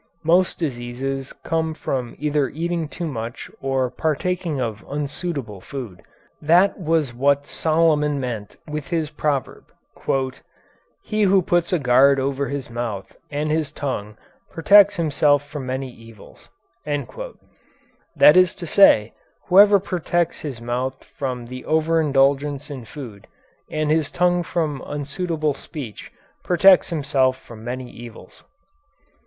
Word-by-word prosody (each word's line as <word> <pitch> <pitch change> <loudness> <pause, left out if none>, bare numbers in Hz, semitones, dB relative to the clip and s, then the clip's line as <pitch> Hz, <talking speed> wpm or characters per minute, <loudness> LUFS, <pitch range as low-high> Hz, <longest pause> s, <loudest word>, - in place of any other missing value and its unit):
Most 175 +3 +3
diseases 135 -1 -4
come 160 -1 -2
from 125 -6 -3
either 150 -2 0
eating 170 0 -2
too 170 +3 -6
much 120 -6 -6
or 135 -2 0
partaking 160 +2 -1
of 110 -4 -3
unsuitable 140 - -4
food. 115 -10 -8 0.4
That 175 +7 +4
was 160 -6 0
what 140 +3 +2
Solomon 155 -2 +1
meant 115 -6 -5
with 150 -2 -5
his 160 -3 -1
proverb: 145 -3 -2 1.4
"He 215 0 -2
who 195 -2 +4
puts 175 0 +1
a 180 - +3
guard 135 0 +4
over 135 +1 -1
his 140 -2 -4
mouth 115 -5 -5
and 150 +1 -2
his 155 -2 0
tongue 105 -8 -4 0.3
protects 200 +4 +6
himself 145 -4 +2
from 145 -3 -6
many 130 0 -3
evils," 115 -3 -16 0.3
that 290 - -1
is 185 -1 +5
to 175 - -7
say, 115 - +5 0.4
whoever 200 +2 +7
protects 175 -2 -1
his 140 -6 -6
mouth 125 +3 -3
from 125 -3 -5
the 130 +1 -8
overindulgence 145 -3 +1
in 130 -4 -7
food 110 -6 -10 0.4
and 155 0 -1
his 155 -2 +1
tongue 175 0 +2
from 155 -5 -2
unsuitable 150 +1 -2
speech 130 - -9 0.3
protects 185 +1 +5
himself 140 -5 +1
from 115 -4 -13
many 125 +1 -5
evils. 120 -1 -12
145 Hz, 125 wpm, -22 LUFS, 130-165 Hz, 1.4 s, whoever